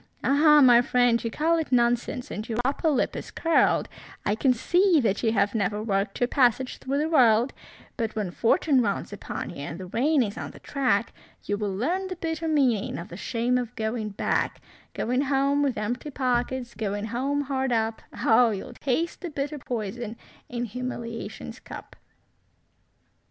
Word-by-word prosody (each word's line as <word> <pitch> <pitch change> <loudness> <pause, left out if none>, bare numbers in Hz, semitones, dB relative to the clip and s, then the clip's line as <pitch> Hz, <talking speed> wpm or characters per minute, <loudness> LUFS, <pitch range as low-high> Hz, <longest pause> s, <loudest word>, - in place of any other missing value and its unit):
Ah! 300 +1 +6
my 245 -3 +7
friend, 245 -1 +2
you 230 - -1
call 325 +7 +1
it 320 - -4
nonsense, 240 +2 +1
and 215 +3 -5
your 225 - -2
upper 285 +4 +1
lip 285 - +1
is - - -6
curled, 330 -1 +2 0.4
I 205 - +2
can 255 +5 +2
see 350 - +3
that 210 -6 0
you 225 - +2
have 200 -1 +2
never 210 -1 -1
worked 195 -2 -1
your 245 - +2
passage 255 -1 +2
through 275 +2 -2
the 300 +2 +1
world; 245 -5 +4 0.4
But 225 -3 -2
when 205 -5 -2
fortune 260 - +3
rounds 205 -2 -2
upon 205 - -5
you 175 - -10
and 145 +4 -6
the 185 - -6
rain 260 - +2
is 205 -2 -5
on - - -5
the - - -13
track, 245 -6 0 0.3
You 205 - -1
will 205 -2 -3
learn 350 - -1
the 370 - -5
bitter 325 -1 -3
meaning 265 -9 +1
of 170 - -7
the 170 - -8
shame 240 +5 0
of 245 -1 -5
going 220 -1 -2
back; 200 - -1 0.4
Going 250 +3 0
home 280 +1 +2
with 275 -3 0
empty 240 +7 -3
pockets, 250 -2 -1
Going 205 -1 -3
home 265 +6 -1
hard 265 -2 -1
up; 225 -1 0 0.2
Oh, 235 +1 +6
you'll 205 -3 -5
taste 320 +6 -2
the 355 - -4
bitter 290 0 -4
poison 230 -1 -4 0.3
in 245 0 -3
humiliation's 235 0 -6
cup. - - -10
245 Hz, 180 wpm, -26 LUFS, 220-280 Hz, 0.4 s, my